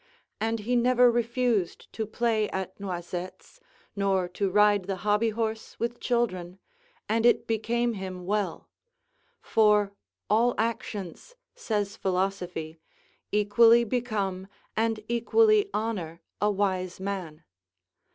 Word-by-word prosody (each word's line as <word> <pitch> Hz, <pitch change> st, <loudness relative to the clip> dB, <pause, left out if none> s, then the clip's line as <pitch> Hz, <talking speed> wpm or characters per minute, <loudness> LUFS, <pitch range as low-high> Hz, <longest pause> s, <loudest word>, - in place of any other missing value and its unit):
And 225 Hz, 0 st, -1 dB
he 245 Hz, +4 st, 0 dB
never 245 Hz, 0 st, +5 dB
refused 235 Hz, -5 st, -1 dB
to 220 Hz, -2 st, -3 dB
play 220 Hz, -1 st, 0 dB
at 190 Hz, 0 st, -5 dB
noisettes, 180 Hz, -, -6 dB, 0.4 s
nor 195 Hz, -2 st, +1 dB
to 195 Hz, +2 st, -1 dB
ride 205 Hz, 0 st, +4 dB
the 195 Hz, 0 st, -2 dB
hobby 210 Hz, +2 st, +3 dB
horse 220 Hz, 0 st, -4 dB
with 235 Hz, +1 st, -2 dB
children, 185 Hz, -7 st, -1 dB, 0.5 s
and 225 Hz, +1 st, +1 dB
it 240 Hz, -, +4 dB
became 235 Hz, +2 st, 0 dB
him 185 Hz, -3 st, -6 dB
well; 200 Hz, -3 st, -2 dB, 0.8 s
for 210 Hz, -2 st, +3 dB, 0.3 s
all 235 Hz, +3 st, +3 dB
actions, 220 Hz, -, -4 dB, 0.2 s
says 210 Hz, -, -2 dB
philosophy, 180 Hz, -4 st, -2 dB, 0.5 s
equally 230 Hz, +3 st, +5 dB
become 205 Hz, -6 st, -2 dB, 0.3 s
and 225 Hz, 0 st, 0 dB
equally 415 Hz, -, +3 dB
honour 185 Hz, -7 st, -3 dB, 0.2 s
a 210 Hz, -, +3 dB
wise 185 Hz, -3 st, -1 dB
man. 185 Hz, -5 st, -5 dB
210 Hz, 110 wpm, -27 LUFS, 190-230 Hz, 0.8 s, never